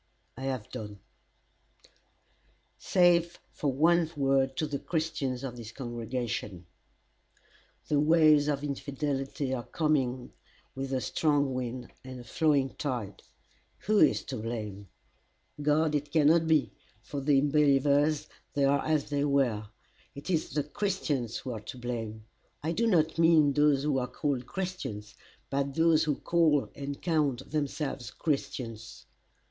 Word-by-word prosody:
I 130 - -6
have 130 -5 -3
done 105 -4 -7 1.8
"Save 175 -1 +3
for 145 - -1
one 165 +4 +3
word 135 -1 +2
to 155 - 0
the 145 -2 -3
Christians 155 -6 -2
of 125 -2 -5
this 115 -2 -8
congregation: 120 -6 -4 1.2
"The 145 - +2
waves 155 -1 +5
of 145 -1 -1
infidelity 140 -1 -3
are 125 - -2
coming 150 -1 +1
in 125 -1 -11 0.4
with 135 0 -5
a 130 -1 0
strong 145 +3 +1
wind 125 -1 -4
and 130 -1 -8
a - - -9
flowing 140 +1 +1
tide. 120 -9 -3 0.6
Who 210 0 +2
is - - +4
to 130 - -5
blame? 105 -3 -5 0.7
God 150 +1 +2
it 145 0 -2
cannot 160 +1 +4
be, 160 -2 +5
and - - -14 0.3
for 145 - -7
unbelievers, 145 +1 +3 0.3
they 140 -1 +3
are 140 +1 +2
as 155 -2 0
they 145 -1 +1
were. 125 -7 +1 0.5
It 140 +6 -5
is 165 -3 0
the 150 - -1
Christians 150 - -2
who 130 - -6
are 115 - -4
to 110 +4 -9
blame. 115 -3 -5 0.4
I 160 - 0
do 230 +7 +1
not 165 -5 +2
mean 160 -4 +5
those 145 -1 +3
who 145 -3 +1
are 125 - -2
called 135 -4 -2
Christians, 180 - -5 0.4
but 140 0 -1
those 160 -1 +4
who 150 -2 +1
call 160 -4 +2
and 140 0 -6
count 145 -7 0
themselves 145 -5 -2
Christians. 130 -6 -4
140 Hz, 140 wpm, -29 LUFS, 125-155 Hz, 1.8 s, waves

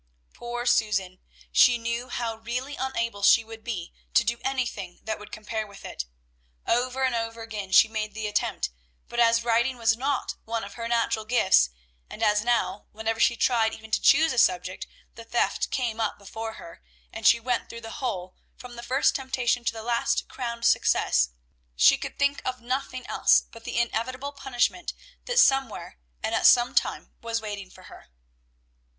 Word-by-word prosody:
Poor 240 0 -5
Susan! 195 -6 +1 0.3
She 245 -1 +6
knew 235 +2 -3
how 235 -2 -2
really 250 +5 -4
unable 230 -5 -3
she 225 +3 +6
would 225 0 -11
be 190 -8 -5 0.2
to - - +6
do 235 +1 -1
anything 250 -9 -3
that 220 - -3
would 210 - -12
compare 215 0 -4
with 200 -1 -13
it. - - -5 0.6
Over 255 +2 0
and 260 -1 +2
over 230 0 -3
again 210 -4 -6
she 190 - +7
made 215 -1 -4
the 220 -1 -4
attempt; 210 - -1 0.4
but 240 - -4
as 230 0 +4
writing 240 +2 +1
was 225 -1 +3
not 270 +3 -2
one 225 0 -3
of 200 - -8
her 230 -1 -5
natural 230 -2 0
gifts, 205 - +4 0.4
and - - -6
as 210 0 +3
now, 235 -3 0
whenever 220 +1 -3
she 235 - +4
tried 225 -2 +2
even 220 0 -13
to - - +1
choose 320 -3 +5
a 250 - +1
subject, 185 -2 +1 0.3
the 230 - -11
theft 235 +1 0
came 230 -3 -2
up 220 - -1
before 220 +3 -7
her, 170 -5 -12 0.3
and - - 0
she 235 - +6
went 245 0 -2
through 230 - -8
the 225 +5 -8
whole, 185 -8 -3 0.2
from 245 -1 -11
the - - -6
first 255 +4 +2
temptation 260 -2 0
to - - +2
the 225 -1 -8
last 235 0 0
crowned 235 -2 -5
success, 65 0 +3 0.5
she - - +6
could - - -7
think 280 0 +1
of 255 -1 -3
nothing 255 +1 -3
else - - +4
but 230 0 -13
the - - -4
inevitable 255 +4 -1
punishment 275 +5 -1 0.3
that - - -2
somewhere 270 - +2 0.2
and - - -1
at - - +5
some 240 0 +5
time - - 0
was 230 0 -2
waiting 205 -3 -6
for 185 - -16
her. - - -14
230 Hz, 180 wpm, -26 LUFS, 220-245 Hz, 0.6 s, she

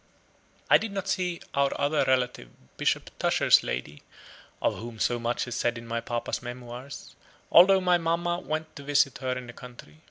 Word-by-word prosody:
I - - +6
did 220 -1 -4
not 195 -1 -4
see 180 -3 -1
our 140 0 +1
other 145 +2 +2
relative, 125 - 0 0.3
Bishop - - -1
Tusher's - - +4
lady, 70 +4 -5 0.6
of - - 0
whom 115 0 -8
so 120 +2 0
much 120 +1 -2
is 120 - -5
said 120 +1 0
in 115 - -9
my 115 0 -3
papa's 120 0 -3
memoirs 120 +2 -9 0.4
although 190 +2 +8
my 180 -1 +3
mamma 170 +1 0
went 155 0 -4
to 140 - -9
visit 140 -2 +2
her 130 -1 -1
in 125 - -7
the 120 - -10
country. 120 -13 -13
130 Hz, 180 wpm, -27 LUFS, 120-165 Hz, 0.6 s, although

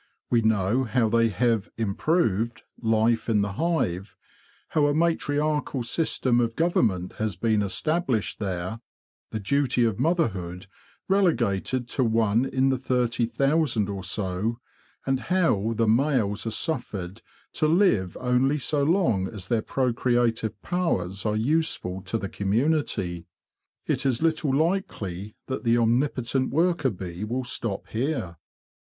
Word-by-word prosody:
We 120 -1 +4
know 110 +3 +2
how 115 -1 +1
they 115 +1 +3
have 110 0 0
' - - -48
improved" 115 - 0 0.2
life 115 +1 +2
in 105 -3 +3
the 100 - -2
hive—how 145 - -2
a 145 - +1
matriarchal 150 -4 0
system 125 -2 +1
of 115 -1 0
government 110 - +1
has 110 -4 -1
been 110 -2 +1
established 130 - -1
there, 95 +1 -3 0.5
the 110 - -4
duty 125 +2 +1
of 110 -2 -1
motherhood 100 - -1 0.4
relegated 130 - +1
to 130 - 0
one 115 +1 +2
in 135 0 +1
the 130 -2 0
thirty 120 -2 0
thousand 135 -3 +1
or 100 -2 -4
so, 95 +4 -2 0.5
and 135 -1 +1
how 130 - +1
the 115 0 +1
males 115 -4 +1
are - - +1
suffered 110 - -3 0.3
to 155 - +1
live 155 - +2
only 130 +3 +2
so 145 +1 0
long 140 - +2
as 95 -3 -8
their 115 -2 +2
procreative 120 -3 0
powers 100 - -1
are 105 - 0
useful 115 - 0
to 95 +5 -1
the 100 - -4
community. 100 - -1 0.6
It 130 - 0
is 125 -3 +1
little 160 -3 +1
likely 105 - -2
that 130 0 -4
the 115 -1 +3
omnipotent 125 +2 +1
worker 165 -2 +2
bee 90 -2 -6
will 125 +4 -2
stop 115 -5 -3
here. 115 - -2
115 Hz, 135 wpm, -25 LUFS, 105-140 Hz, 0.6 s, We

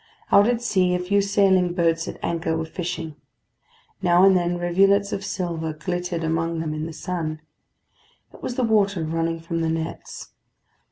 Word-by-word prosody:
Out 205 +1 +6
at 240 -1 0
sea 185 -5 +2
a - - 0
few 200 +3 +2
sailing 195 -3 +2
boats 165 -2 +1
at - - -6
anchor 165 -1 -1
were 160 - -2
fishing. 165 -2 -5 0.8
Now 175 0 +4
and 195 -1 +6
then 175 -1 +1
rivulets 195 +3 +2
of 195 - -3
silver 165 -4 -3
glittered 175 +2 -3
among 165 +1 -1
them 160 -1 -3
in 155 +1 -4
the - - -7
sun: 160 -2 -4 0.9
it - - -15
was 245 - -4
the 255 - 0
water 200 -6 +2
running 165 +1 -1
from 165 0 -3
the 165 - 0
nets. 165 0 -5
175 Hz, 170 wpm, -23 LUFS, 165-190 Hz, 0.9 s, Out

